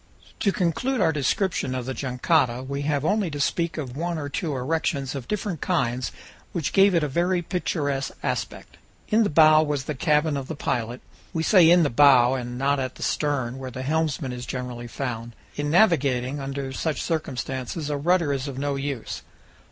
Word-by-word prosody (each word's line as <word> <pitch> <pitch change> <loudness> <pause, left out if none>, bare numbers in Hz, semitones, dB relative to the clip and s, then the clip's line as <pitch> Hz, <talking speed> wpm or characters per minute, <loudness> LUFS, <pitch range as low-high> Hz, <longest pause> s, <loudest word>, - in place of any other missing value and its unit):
To 200 - +2
conclude 195 +10 0
our 165 -5 +3
description 145 -1 0
of 125 -2 -3
the 130 - -3
jangada, 130 0 +1
we 140 +1 -4
have 145 0 0
only 205 +1 +1
to 145 -1 -5
speak 170 +4 0
of 130 -5 -5
one 170 +2 -2
or 145 -2 -4
two 150 +1 -2
erections 140 0 -1
of 135 -4 -6
different 200 -6 -3
kinds 125 0 0 0.4
which 165 -5 -2
gave 195 -1 +5
it 165 - +3
a - - +1
very 175 +5 0
picturesque 145 -6 -1
aspect. - - -4 0.3
In 220 +2 +4
the 210 - +2
bow 155 0 +6
was 145 -3 -1
the 150 - -3
cabin 150 +1 +1
of 135 -1 -5
the 160 - -5
pilot 120 -2 -2 0.3
we 160 -2 -1
say 175 -3 +6
in 175 0 +6
the 145 - +1
bow, 130 -1 +6
and 120 -2 -4
not 140 +2 +1
at 130 -1 -3
the - - -7
stern, 135 -4 -1
where 130 -1 -5
the 130 +1 -6
helmsman 150 -2 -1
is 125 0 -7
generally 125 -2 -5
found. 120 -2 -5 0.2
In 145 0 -2
navigating 145 - +3
under 135 0 -4
such 155 +1 -2
circumstances 145 -1 -3
a - - 0
rudder 165 0 +2
is 135 +1 -3
of 135 -2 -6
no 140 +1 -1
use. 135 -3 -4
145 Hz, 190 wpm, -25 LUFS, 130-165 Hz, 0.4 s, bow